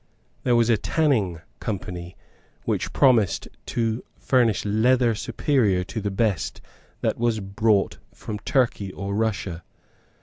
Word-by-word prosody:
There 125 -2 +2
was 120 0 +4
a 110 - +3
Tanning 110 - +1 0.2
Company 90 -5 -5 0.5
which - - -1
promised 120 -9 +3 0.2
to 115 0 -1
furnish 120 -6 +2
leather 115 +3 +3
superior 105 -4 +1
to 110 +4 -5
the 100 - -1
best 100 -4 -1 0.4
that - - 0
was 115 -2 +1
brought 100 +1 +1
from 105 -1 -6
Turkey 110 -5 0
or 100 +1 -4
Russia. 100 -5 -1
110 Hz, 125 wpm, -24 LUFS, 100-120 Hz, 0.5 s, was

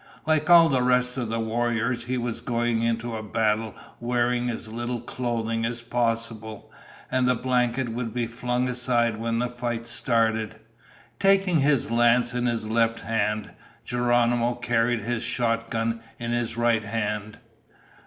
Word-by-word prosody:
Like 155 0 +1
all 170 -1 +8
the 135 -4 +2
rest 125 0 +2
of 120 -4 -2
the 115 0 -1
warriors, 120 +1 -1
he 130 +1 -1
was 120 -1 -3
going 120 -1 0
into 115 -1 -1
battle 110 0 0 0.2
wearing 120 0 0
as 115 -2 -5
little 120 +2 -4
clothing 115 -2 -2
as 115 +1 -3
possible, 115 -2 -2 0.4
and 130 -1 +2
the 125 - +3
blanket 125 0 0
would 115 0 -3
be 120 0 -1
flung 125 +2 -2
aside 120 -2 +1
when 115 +1 -1
the 120 - +1
fight 120 -1 -4
started. 110 -2 +1 0.6
Taking 195 -4 +3
his 140 -5 +2
lance 120 +1 +3
in 125 0 0
his 115 -2 -1
left 115 0 +1
hand, 105 -1 -1 0.3
Geronimo 120 0 +2
carried 120 -1 +1
his 120 +2 -2
shotgun 115 -1 -1 0.2
in 120 0 -4
his 120 -1 -1
right 120 -2 +2
hand. 105 0 -3
120 Hz, 145 wpm, -25 LUFS, 115-125 Hz, 0.6 s, all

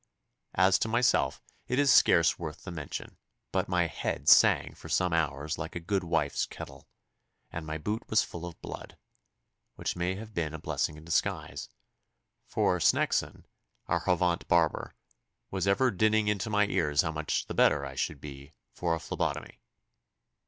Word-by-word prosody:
As 95 +1 +4
to - - 0
myself 120 +2 +1 0.2
it 125 +1 -1
is 140 -2 +5
scarce 85 -1 +5
worth 80 -3 -7
the 95 - -7
mention, 75 -4 -7 0.3
but - - -1
my 90 -1 +2
head 80 - -4
sang - - +6
for - - -12
some 90 -2 +1
hours 75 -2 -1
like - - -6
a - - -2
good 95 +3 -1
wife's 80 -4 0
kettle, - - -10 0.6
and 80 -1 -6
my 80 +1 -3
boot 105 +8 -4
was 110 - +4
full 85 0 -7
of 85 - -11
blood, - - -8 0.8
which - - -3
may 90 +1 -1
have 110 +2 -9
been 80 -4 -2
a - - -7
blessing 75 0 -2
in 80 - -13
disguise, 85 - -2 0.8
for - - +1
Sneckson, - - +1 0.4
our 85 - 0
Havant 90 -1 0
barber, 85 -2 +1 0.6
was 95 -1 -1
ever 125 +6 +3
dinning 110 +2 +2
into 105 0 0
my 105 -1 +3
ears 75 -7 +1
how 80 - -2
much 75 -1 -2
the - - -6
better 70 -1 +3
I 70 - -7
should 70 - -3
be 70 +1 -10 0.2
for 85 -2 0
a - - -5
phlebotomy. 80 - -4
85 Hz, 165 wpm, -29 LUFS, 80-100 Hz, 0.8 s, sang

